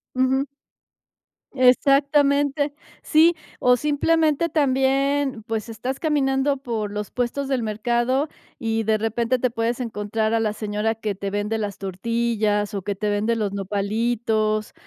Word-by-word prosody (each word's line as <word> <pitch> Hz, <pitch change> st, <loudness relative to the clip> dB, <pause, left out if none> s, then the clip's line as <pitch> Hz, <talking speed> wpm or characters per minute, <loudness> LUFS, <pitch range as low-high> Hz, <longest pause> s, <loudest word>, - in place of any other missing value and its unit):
Ujú. 260 Hz, +1 st, +2 dB, 1.1 s
Exactamente. 280 Hz, +2 st, +3 dB, 0.3 s
Sí, 325 Hz, +2 st, +5 dB, 0.3 s
o, 250 Hz, 0 st, +5 dB
simplemente 305 Hz, +3 st, +1 dB
también, 275 Hz, -3 st, +1 dB
pues, 220 Hz, 0 st, -4 dB
estás 250 Hz, +4 st, -4 dB
caminando 280 Hz, -2 st, +1 dB
por 230 Hz, -6 st, -3 dB
los 210 Hz, -1 st, -5 dB
puestos 250 Hz, +3 st, -2 dB
del 265 Hz, -3 st, 0 dB
mercado 240 Hz, +6 st, 0 dB, 0.3 s
y 225 Hz, -3 st, -1 dB
de 220 Hz, 0 st, +2 dB
repente 230 Hz, +3 st, 0 dB
te 255 Hz, 0 st, 0 dB
puedes 230 Hz, +1 st, -1 dB
encontrar 220 Hz, -1 st, -2 dB
a 230 Hz, -, +2 dB
la 215 Hz, -1 st, 0 dB
señora 215 Hz, +1 st, -1 dB
que 215 Hz, -2 st, -3 dB
te 195 Hz, +1 st, -4 dB
vende 205 Hz, +2 st, -1 dB
las 205 Hz, -3 st, -3 dB
tortillas, 210 Hz, +1 st, -1 dB
o, 200 Hz, -, -2 dB
que 205 Hz, +2 st, -2 dB
te 210 Hz, +2 st, -2 dB
vende 215 Hz, +3 st, 0 dB
los 210 Hz, -3 st, -1 dB
nopalitos, 215 Hz, +2 st, -1 dB
230 Hz, 135 wpm, -23 LUFS, 215-270 Hz, 1.1 s, Sí